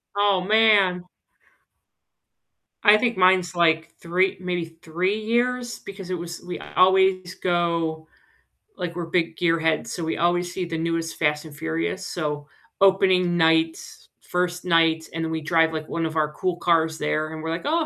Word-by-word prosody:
Oh, 200 -2 +2
man. 200 -3 +3 1.8
I 210 -1 +7
think 235 0 0
mine's 185 -1 +3
like 165 -1 +2
3 180 +3 0
maybe 175 -3 -4
3 180 +6 -1
years 240 +2 -1
because 195 -2 -10
it 185 - -1
was 170 0 -7
we 180 0 -7 0.2
always 185 0 +3
go 170 -3 -1 0.7
like 175 -1 -4
we're 175 -1 -4
big 165 -1 0
gear 165 -1 +1
heads, 160 -1 0
so, 170 - -4
we 160 - -2
always 175 +1 0
see 185 - -3
the 165 -2 -4
newest 165 0 -2
Fast& 150 0 0
Furious. 165 +5 -3
So, 150 -3 -4 0.3
opening 185 -2 +3
night, 160 -1 +3 0.4
1st 180 0 -2
night, 165 -2 +2
and 165 0 -2
then 160 - -4
we 160 - -3
drive, 165 +1 +2
like, 155 -1 -5
one 165 -1 -2
of 160 0 -4
our 150 -1 +1
cool 180 +3 -2
cars 165 -2 +1
there, 155 +1 -2
and 160 0 -7
we're 160 - -3
like, 165 +2 -3
"Oh, 320 +2 +1
175 Hz, 165 wpm, -23 LUFS, 160-185 Hz, 1.8 s, I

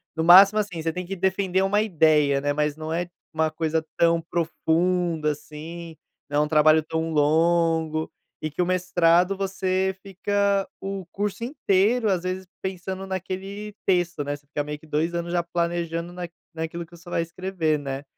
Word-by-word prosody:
No 160 - 0
máximo, 195 +5 +8
assim, 200 -6 -2
você 165 0 -1
tem 180 0 -4
que 195 +1 -5
defender 190 0 +1
uma 205 +2 +2
ideia, 155 -7 +3
né, 145 +1 0
mas 150 0 0
não 160 +1 -4
é 175 +1 -2 0.2
uma 160 0 +1
coisa 160 0 -1
tão 170 0 +4
profunda 165 -1 0
assim, 160 +3 -8 0.3
não 145 +1 +2
é - - +2
um - - -4
trabalho 155 +1 +5
tão 160 +1 -2
longo, 160 +1 +2 0.3
e 155 - -2
que 150 +5 -3
o - - +2
mestrado 180 0 +3
você 190 -1 0
fica 200 +1 0
o 195 -2 -5
curso 205 +2 -3
inteiro 230 -3 +2
às 185 -2 0
vezes 185 +1 -3 0.2
pensando 190 0 -4
naquele 190 +2 -5
texto, 175 -5 +1
né, 145 0 -3
você 145 - -29
fica 145 0 -2
meio 150 0 -6
que 160 - -17
dois 155 +3 0
anos 170 0 -3
já 175 -1 +1
planejando 170 0 -2
naq 175 -1 -6 0.2
naquilo 165 +1 -4
que 170 - -16
você 170 +1 -14
vai 170 - 0
escrever, 170 -2 -1
né. 135 -1 -5
170 Hz, 180 wpm, -24 LUFS, 160-190 Hz, 0.3 s, máximo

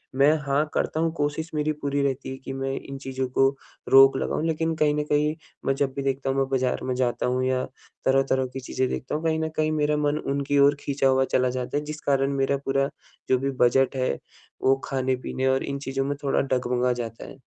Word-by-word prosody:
मैं 140 +3 +5
हाँ, 140 +2 +1
करता 155 - -1
हूँ, 165 0 +1
कोशिश 150 +2 -1
मेरी 150 0 +1
पूरी 140 0 0
रहती 135 -1 -2
है 130 - -5
कि 135 - -4
मैं 135 0 -2
इन 135 - -8
चीज़ों 130 -1 -3
को 135 +1 +4 0.4
रोक 135 0 +8
लगाऊँ। 160 - -1
लेकिन 160 0 0
कहीं 150 -1 +2
न 150 - 0
कहीं 150 +1 +2 0.3
मैं 135 - +2
जब 135 -1 0
भी 140 - -2
देखता 135 0 -1
हूँ 135 - 0
मैं 135 - +2
बाज़ार 130 -1 0
में 130 -1 -1
जाता 125 -1 0
हूँ 125 +1 0
या 130 0 +1 0.4
तरह-तरह 135 0 +2
की 135 - -4
चीज़ें 130 0 -1
देखता 130 - -3
हूँ 155 - -3
कहीं 160 -1 +1
न 160 0 -1
कहीं 155 0 +2
मेरा 150 -1 +1
मन 150 0 +1
उनकी 140 +1 0
ओर 140 +1 +6
खींचा 140 -1 0
हुआ 130 0 +3
चला 125 0 +3
जाता 125 +2 -3
है। 150 - -2
जिस 150 +1 -7
कारण 140 0 +1
मेरा 135 +1 +1
पूरा 135 0 +1 0.4
जो 130 - +4
भी 135 +1 -1
बजट 135 +2 +3
है 130 - 0 0.5
वो 135 - +5
खाने 130 -1 0
पीने 130 0 -1
और 130 0 +2
इन 140 0 -3
चीज़ों 135 -1 -2
में 145 - -1
थोड़ा 135 - +2
डगमगा 125 -1 0
जाता 115 -2 -6
है। - - -11
135 Hz, 230 wpm, -25 LUFS, 130-145 Hz, 0.5 s, रोक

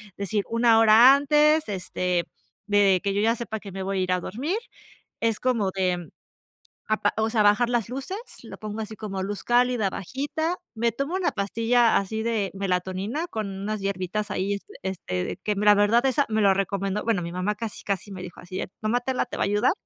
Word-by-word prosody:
decir 200 +1 -1
1, 230 0 +4
hora 225 +4 +8
antes, 300 +2 +3
este, 180 -2 -1 0.4
de 200 -3 +4
que 200 -1 0
yo 205 - +1
ya 230 +2 +3
sepa 220 -2 -5
que 200 -2 -10
me 190 +1 -6
voy 195 +1 -2
a 185 - +1
ir 185 - -1
a 180 - +2
dormir, 275 - -3 0.6
es 225 -2 0
como 230 -7 +1
de, 185 -2 0
mm, 175 -2 -9 0.8
apa 215 0 +1
o 220 0 +1
sea, 220 -2 +3
bajar 210 +4 +4
las 235 -3 0
luces, 275 - -5 0.2
lo - - -10
pongo 215 0 -5
así 220 0 -5
como 195 -3 -4
luz 200 +1 -4
cálida, 245 -3 +2
bajita. 290 - -3 0.2
Me 230 0 0
tomo 275 +8 -3
una 375 -2 +1
pastilla 230 +3 +2
así 220 +3 -1
de 220 -4 -1
melatonina 190 - -2
con 215 -7 -4
unas 200 +2 -4
hierbitas 195 +2 -2
ahí, 200 0 -1
este, - - -13
este 130 - -3
de - - -4
que 210 +1 -2
me 205 - -1
la 210 - +8
verdad 210 +5 +3
esa 275 +2 +2
me 220 -1 +1
lo 195 -1 +6
recomendó, 195 +1 -1
bueno, 225 -6 +1
mi 170 0 -5
mamá 185 +4 -1
casi 225 -1 -6
casi 200 0 -3
me 185 - -7
dijo 180 -1 -9
así: 180 +1 -6
"Eh, - - -4
tómatela, 245 +4 0
te - - -7
va - - +2
a - - 0
ayudar". 205 +5 +2
210 Hz, 210 wpm, -25 LUFS, 195-235 Hz, 0.8 s, hora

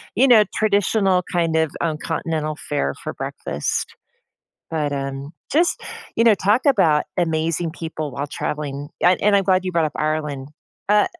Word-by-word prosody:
you 255 +6 +5
know, 220 -3 +8
traditional 200 -3 +2
kind 165 -2 +1
of, 160 -2 +1
um, 160 -2 0
continental 155 -1 -2
fare 70 - -2
for - - -4
breakfast. 70 - -3 0.8
But, 150 -3 -1
um, 135 +1 -4 0.2
just, 335 +4 +2 0.4
you 230 - +3
know, 225 -2 +7
talk 205 +6 +2
about 165 - +4
amazing 165 0 0
people 160 -2 -5
while 145 - -3
traveling. 145 -1 -4
I 180 +1 +6
and 205 0 +4
I'm 195 - +2
glad 185 -1 +2
you 185 - -1
brought 165 -2 +2
up 150 - -6
Ireland. 150 -3 -2 0.4
Uh, 210 0 +4
160 Hz, 160 wpm, -21 LUFS, 150-195 Hz, 0.8 s, know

